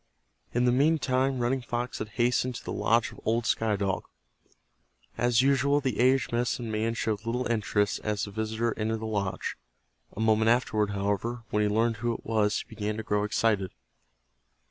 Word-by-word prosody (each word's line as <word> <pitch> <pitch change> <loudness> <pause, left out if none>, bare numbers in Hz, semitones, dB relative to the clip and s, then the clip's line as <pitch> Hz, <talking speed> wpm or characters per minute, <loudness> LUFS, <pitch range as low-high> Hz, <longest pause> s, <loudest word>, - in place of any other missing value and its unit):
In 120 +1 +1
the 125 - +4
meantime 135 -1 +2
Running 125 +2 0
Fox 120 0 -3
had 110 - -4
hastened 125 +1 +1
to - - -7
the - - -4
lodge 115 0 +2
of - - -13
old 115 +1 0
Sky 110 -1 +1
Dog. 100 -1 -1 1.1
As 120 0 +3
usual 140 +1 +3
the 130 -7 -2
aged 130 +2 +3
medicine 120 -1 -1
man 110 +2 -1
showed 110 -2 -2
little 120 +2 -1
interest 105 -3 0
as 105 -2 -1
the 100 - -9
visitor 110 +2 -1
entered 110 +1 0
the - - -4
lodge. 100 -3 -2 0.6
A - - -5
moment 110 0 +3
afterward, 110 -3 +2
however, 105 +4 -2
when 105 - +2
he 105 - +2
learned 115 +2 +1
who 120 +1 -1
it - - -10
was 110 -2 +1
he - - -14
began 105 0 -3
to 110 - -4
grow 105 -2 0
excited. 105 -2 +1
115 Hz, 180 wpm, -28 LUFS, 105-120 Hz, 1.1 s, the